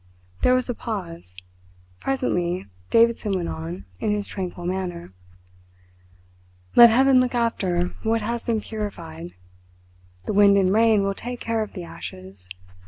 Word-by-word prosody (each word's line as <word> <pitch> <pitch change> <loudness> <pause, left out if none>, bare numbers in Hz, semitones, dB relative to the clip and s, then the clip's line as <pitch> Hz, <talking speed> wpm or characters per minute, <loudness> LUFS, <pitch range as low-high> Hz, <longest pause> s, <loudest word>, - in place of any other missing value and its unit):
There 250 - +4
was 255 -1 0
a 245 - -1
pause. 170 - -6 0.6
Presently 180 -10 -1 0.2
Davidson 230 -3 +3
went 180 -3 -2
on, 85 +4 -6
in - - -1
his 210 0 0
tranquil 180 -3 -6
manner: 175 - -4 1.6
"Let 235 0 +10
Heaven 260 +3 +5
look 250 -1 0
after 185 -7 0
what 225 0 0
has 235 +2 -3
been 225 -2 0
purified. 175 -7 -7 0.9
The - - -2
wind 200 0 +6
and 190 -1 +3
rain 220 -2 +4
will 195 0 0
take 245 +4 -6
care 230 -1 -1
of 215 - -5
the 180 - -6
ashes. 95 - -10
200 Hz, 140 wpm, -23 LUFS, 175-230 Hz, 1.6 s, Let